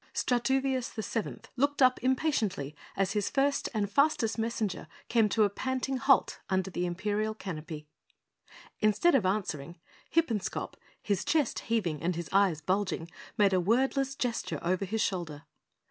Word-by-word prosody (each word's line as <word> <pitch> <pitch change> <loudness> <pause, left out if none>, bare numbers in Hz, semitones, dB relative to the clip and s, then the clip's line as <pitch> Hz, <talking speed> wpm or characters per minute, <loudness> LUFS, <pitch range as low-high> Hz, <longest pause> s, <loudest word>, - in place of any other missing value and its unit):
Strutoovious 260 +1 +1
the 220 - -5
Seventh 225 0 -4
looked 285 +3 +1
up 255 -1 +5
impatiently 235 - 0 0.2
as 195 0 +1
his 205 -1 0
first 280 0 +1
and 210 -3 0
fastest 235 -2 +2
messenger 220 -7 -2 0.2
came 225 -3 +3
to 220 +1 +3
a 205 - +3
panting 260 +4 -2
halt 270 +2 +3
under 190 0 0
the 180 0 -1
Imperial 210 +4 -1
Canopy. 160 -6 -6 0.9
Instead 215 +11 +3
of 225 -9 +3
answering, 175 -6 -2 0.3
Hippenscop, 235 - 0 0.3
his 200 -3 0
chest 305 -6 +1
heaving 180 -10 0
and 175 +1 0
his 170 -1 -5
eyes 195 -5 +3
bulging, 180 -1 -1 0.3
made 200 -3 +4
a 185 - +3
wordless 265 +6 +1
gesture 245 -3 -2
over 185 +3 0
his 220 +3 -1
shoulder. 170 -8 -2
215 Hz, 145 wpm, -30 LUFS, 185-255 Hz, 0.9 s, up